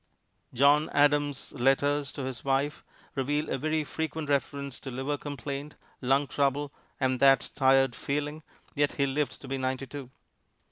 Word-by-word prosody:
John 145 +4 +4
Adams' 145 -1 +2
letters 140 +2 +2
to 140 - -5
his 130 -3 -5
wife 140 +2 0 0.3
reveal 145 +3 -1
a 135 - -1
very 155 +2 0
frequent 160 0 -4
reference 140 -1 -1
to 135 - -7
liver 135 +3 -2
complaint, 145 +1 -6 0.3
lung 135 +2 +3
trouble, 140 +1 0 0.3
and 130 -2 +1
that 135 0 +5
tired 135 -1 +4
feeling, 150 +4 -3 0.3
yet 145 -1 +1
he 140 - +1
lived 140 +2 -1
to - - -8
be 135 0 -2
ninety 130 +1 -2
two. 135 -1 -8
140 Hz, 150 wpm, -29 LUFS, 135-145 Hz, 0.3 s, that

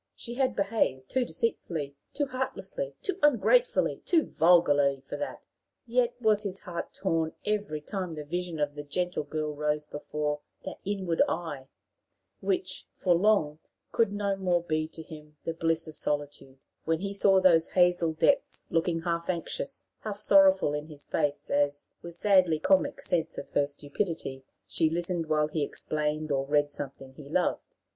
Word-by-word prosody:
She 235 - -7
had 255 -2 +1
behaved 195 -11 0
too 260 0 +1
deceitfully, 160 -12 -2 0.2
too 290 - 0
heartlessly, 270 - -4
too 390 -1 -2
ungratefully, 295 - +3
too 330 -3 +3
vulgarly 145 -5 +4
for 135 - -7
that! 290 - -5 0.4
Yet 240 0 +1
was 215 -3 +3
his 195 -2 -4
heart 175 -4 -5
torn 165 -4 -1
every 205 -7 -1
time 180 0 -4
the 150 - -5
vision 175 +1 -3
of 145 -1 0
the 145 - -6
gentle 175 +5 -2
girl 150 0 -3
rose 150 0 -1
before 150 0 -3 0.3
"that - - -6
inward 190 -4 0
eye," 150 -6 -4 0.7
which, 370 -1 -1
for 180 - +2
long, 170 -5 +3 0.3
could 225 -3 +2
no 200 -1 0
more 180 -3 +1
be 155 -1 -1
to 160 0 -9
him 150 -1 -12
"the 165 - -2
bliss 165 0 0
of 155 - -9
solitude"; 145 -2 -3 0.3
when 165 +1 0
he 200 0 -3
saw 195 -1 +4
those 170 -3 +4
hazel 175 -2 +4
depths 275 - +1
looking 165 0 +1
half 170 0 -2
anxious, 185 - -2 0.2
half 210 -2 -5
sorrowful 195 -6 +5
in 150 +1 -3
his 150 -2 -8
face, 145 -2 -1
as, 145 0 +1
with 170 -1 -9
sadly 185 -4 +4
comic 190 +4 +2
sense 165 -1 0
of - - -7
her 145 - +2
stupidity, 145 -1 -3 0.2
she 160 - +1
listened 170 0 -1
while 155 -1 +2
he 155 0 -2
explained 150 +1 -2
or 135 -1 0
read 145 0 +2
something 135 -2 -6
he 140 0 -12
loved. 175 +3 -1
165 Hz, 165 wpm, -29 LUFS, 150-195 Hz, 0.7 s, sorrowful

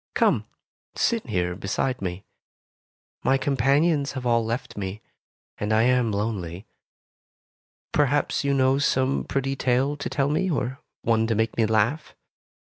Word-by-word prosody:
"Come, - - +2 0.5
sit 230 - 0
here 90 -5 -1
beside 115 +7 -2
me. 95 +1 -4 1.0
My 135 - +3
companions 140 +3 +2
have 130 -2 -5
all 115 -1 +3
left 115 +3 -4
me, 95 0 -4 0.6
and 105 +1 -2
I 110 +1 +4
am 125 -2 +3
lonely. 100 -3 -3 1.3
Perhaps 145 0 +1
you 140 0 +1
know 135 0 +3
some 135 -1 +1
pretty 135 0 -1
tale 130 +2 +1
to - - -4
tell 140 0 0
me, 185 +6 +1
or 135 -4 -2 0.2
one 115 -1 +2
to 115 - +1
make 110 +1 0
me 115 -2 +2
laugh. 115 +8 0
125 Hz, 140 wpm, -25 LUFS, 110-140 Hz, 1.3 s, I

